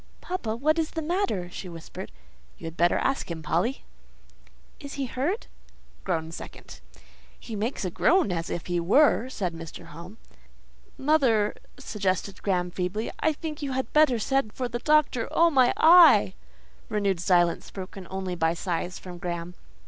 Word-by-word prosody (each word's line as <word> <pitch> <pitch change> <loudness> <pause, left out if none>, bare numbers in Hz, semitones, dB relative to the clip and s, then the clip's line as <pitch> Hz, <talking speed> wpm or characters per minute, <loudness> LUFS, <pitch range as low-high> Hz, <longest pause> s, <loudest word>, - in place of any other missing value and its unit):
"Papa, 235 -12 -3
what 310 +7 +1
is 320 0 0
the 325 - -4
matter?" 340 - -1
she 185 - -7
whispered. 165 - -9 0.5
"You - - -10
had 165 0 -6
better 175 0 +3
ask 270 -6 -1
him, 165 -2 -5
Polly." 180 - -1 1.0
"Is 280 -2 -8
he 275 -1 -2
hurt?" 285 - -2 0.6
(groan 165 -3 -2
second.) - - -10 0.6
"He 225 - -7
makes 215 +1 -2
a 180 - -2
noise 330 - +3
as 165 -1 -3
if 175 - -4
he 175 -1 -1
were," 250 - +4
said 185 -8 -3
Mr. 165 -1 -9
Home. 175 +7 -10 0.8
"Mother," 260 -8 +2 0.2
suggested 195 -1 -2
Graham, 180 -3 0
feebly, 185 +5 -3
"I 315 - +2
think 310 0 -6
you 275 -2 -3
had 260 -2 -3
better 300 -5 +5
send 270 -1 0
for 255 - -2
the 240 0 -4
doctor. 300 -5 +2
Oh 335 0 +4
my 260 -4 +5
eye!" 320 - +7 0.6
(renewed 200 -4 0
silence, 175 -1 +2
broken 190 -1 -8
only 190 -1 -4
by 165 -1 +1
sighs 175 +1 -3
from 180 -2 -10
Graham.) 175 -1 -4
205 Hz, 160 wpm, -26 LUFS, 175-275 Hz, 1.0 s, eye